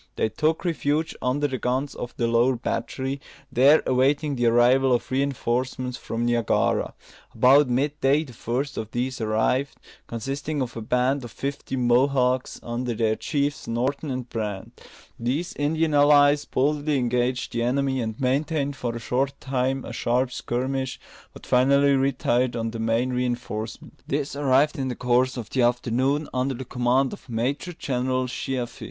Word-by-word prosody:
They 110 - 0
took 155 - 0
refuge 160 -2 0
under 140 +4 +1
the 130 -2 -4
guns 130 +3 -1
of 120 - -7
the 120 - +1
lower 120 +3 +3
battery, 135 +3 -3 0.3
there 135 +5 +5
awaiting 140 +3 +2
the 120 -2 +1
arrival 125 +3 +4
of 120 - -1
reinforcements 130 -1 -1
from 115 -1 -3
Niagara. 120 -2 +1 0.4
About 130 +4 +5
mid 140 +4 0
day 140 +3 +3
the 130 -6 -12
first 130 +6 -3
of 110 - -5
these 125 +2 -3
arrived, 110 +5 0 0.3
consisting 140 +6 -4
of 130 -3 -3
a 115 - -5
band 125 +4 +1
of 120 - -7
fifty 140 +2 -4
Mohawks, 125 +1 +2
under 120 0 -3
their 110 -1 +1
chiefs, 145 +1 -2
Norton 130 +6 -1
and 130 -2 -4
Brant. 105 -4 -5 0.4
These 130 +9 -2
Indian 155 +2 0
allies 145 0 +5
boldly 145 +2 0
engaged 125 0 0
the 120 - -1
enemy, 130 +2 0
and 110 +1 -4
maintained 140 +2 0
for 120 -4 -3
a - - -4
short 130 +4 -1
time 130 0 -1
a - - -7
sharp 125 +2 0
skirmish, 130 +2 -3 0.3
but - - -13
finally 140 +3 +4
retired 130 -2 +1
on 115 -1 -2
the 115 - -6
main 115 +3 +1
reinforcement. 120 -3 -4
This 140 0 -2
arrived 145 +2 +2
in 135 - -1
the 125 - -3
course 125 +2 +1
of 115 -3 -6
the 130 - +1
afternoon, 125 +4 +1
under 130 +1 0
the 130 +2 -7
command 125 +2 +1
of 130 - -12
Major 130 +9 -2
General 130 -3 -1
Sheaffe. 125 -1 -4
130 Hz, 160 wpm, -24 LUFS, 120-140 Hz, 0.4 s, there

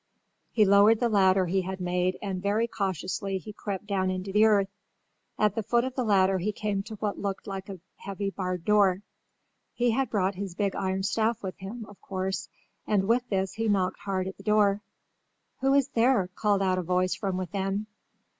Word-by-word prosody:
He 215 -3 +3
lowered 205 +3 +6
the 240 -1 +2
ladder 190 -3 +4
he 190 +2 +1
had 190 +1 -5
made 180 0 0
and 190 -2 -3
very 205 +4 +1
cautiously 195 -1 -2
he 210 +3 -9
crept 200 -1 -5
down 190 -2 0
into 185 +1 -3
the 210 +1 +6
earth. 200 -3 +3 0.7
At 210 -2 +2
the 225 - -1
foot 235 +3 +1
of 260 - -4
the 255 - -1
ladder 195 -3 +3
he 205 +4 -1
came 205 -1 -2
to 215 +2 -8
what 210 -1 -3
looked 195 -1 -3
like 195 -1 -6
a 190 -2 -7 0.2
heavy 200 0 -4
barred 185 -3 -4
door. 200 -2 +3 0.7
He 240 -1 +2
had 265 +1 0
brought 195 -3 +1
his 190 -2 -6
big 200 -1 -1
iron 190 -1 -1
staff 225 +3 0
with 190 -1 -5
him, 215 +4 -7
of 205 - -15
course, 190 0 -3 0.4
and 195 -2 +2
with 240 +2 +2
this 190 -1 -1
he 225 0 -2
knocked 190 -3 +1
hard 190 -2 -2
at 190 - -7
the 200 - -13
door. 210 -1 +3 0.8
"Who 270 +1 +3
is 280 -1 +3
there?" 230 -6 +2
called 205 0 +1
out 185 -1 +1
a - - 0
voice 180 +1 +1
from 190 -3 -2
within. 195 +2 -2
195 Hz, 200 wpm, -27 LUFS, 190-215 Hz, 0.8 s, lowered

